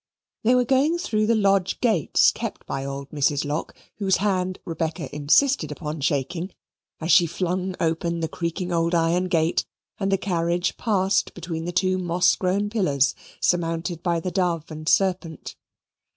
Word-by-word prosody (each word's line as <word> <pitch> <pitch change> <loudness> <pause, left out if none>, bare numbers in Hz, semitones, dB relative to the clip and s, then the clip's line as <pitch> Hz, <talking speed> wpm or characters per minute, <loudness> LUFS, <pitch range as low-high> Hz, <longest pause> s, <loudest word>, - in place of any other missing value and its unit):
They 240 +3 +4
were 250 -1 +3
going 275 +7 +2
through 215 -11 0
the 230 - +3
lodge 195 -3 +2
gates 215 - +3
kept - - -6
by 135 - -4
old 140 0 -6
Mrs. 145 0 +1
Lock, 150 +3 -3 0.2
whose 195 -3 +2
hand 185 -2 0
Rebecca 160 -2 -4
insisted 155 - +3
upon 150 0 -5
shaking, 165 +7 -1 0.5
as 165 +2 -1
she 175 -2 +6
flung 180 +2 -2
open 170 +1 -1
the 165 - -1
creaking 170 +2 -4
old 170 0 +1
iron 170 +2 +2
gate, 165 -2 +1 0.4
and 195 -1 0
the 195 - +3
carriage 175 -2 -1
passed 195 -3 0
between 165 -2 -5
the 175 - -2
two 185 +1 +1
moss 175 0 +2
grown 195 +2 0
pillars 145 - +2 0.3
surmounted 165 0 0
by 170 -2 0
the 180 +2 -4
dove 175 -4 -1
and 155 +1 -4
serpent. 180 -5 0
175 Hz, 160 wpm, -24 LUFS, 160-190 Hz, 0.5 s, she